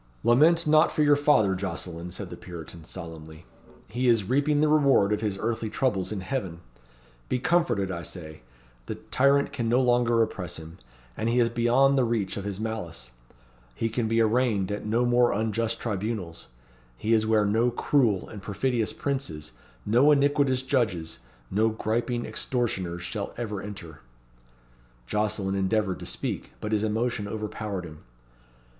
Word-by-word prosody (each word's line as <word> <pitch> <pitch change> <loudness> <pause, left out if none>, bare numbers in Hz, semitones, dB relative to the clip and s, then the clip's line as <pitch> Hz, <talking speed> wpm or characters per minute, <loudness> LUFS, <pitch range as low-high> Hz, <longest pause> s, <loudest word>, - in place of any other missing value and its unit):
"Lament 160 +8 +5
not 155 +1 +5
for 155 - +1
your 145 0 +5
father, 145 -9 +3
Jocelyn," 90 -2 -4
said 90 - -7
the - - -5
Puritan, 85 -1 -10
solemnly; 80 -2 -9 0.4
"he 125 +4 -1
is 115 -5 +3
reaping 145 +4 +2
the 155 - +4
reward 140 -9 +4
of 105 - -1
his 105 -3 -1
earthly 110 0 -2
troubles 105 -7 -1
in 105 -3 -3
heaven! 95 -6 -4 0.7
Be - - +1
comforted, 120 - +1
I 85 -2 -4
say. 80 -2 -9 0.5
The - - -3
tyrant 140 +1 +2
can 120 -5 -1
no 120 +2 +4
longer 120 -2 +3
oppress 90 -5 -5
him. 80 +1 -11 0.4
He 115 +2 +1
is 120 -1 +3
beyond 125 +4 +3
the - - +4
reach 115 -5 -1
of 100 - -5
his 100 -1 -4
malice. 85 - -5 0.6
He 115 - -1
can 115 0 -1
be 115 +1 +1
arraigned 110 -4 +1
at 105 +1 -4
no 115 +3 +2
more 120 0 +4
unjust 110 +1 -1
tribunals. 100 -5 -4 0.5
He 110 +2 0
is 110 -1 +3
where 110 -1 +3
no 115 +4 +2
cruel 120 -6 +1
and 105 - -9
perfidious 115 +3 -1
princes, 85 - -3 0.3
no 125 +7 +4
iniquitous 140 -2 +3
judges, 110 - -1 0.3
no 110 +3 +3
griping 120 +2 -2
extortioners 95 -9 -2
shall 100 +4 -5
ever 105 -4 -4
enter." 90 -8 -9 1.0
Jocelyn 105 - -1
endeavoured 100 0 0
to - - -7
speak, - - -4
but 105 - -4
his 105 -1 +1
emotion 110 -1 -1
overpowered 105 -3 -4
him. 75 -2 -11
110 Hz, 155 wpm, -26 LUFS, 95-125 Hz, 1.0 s, Lament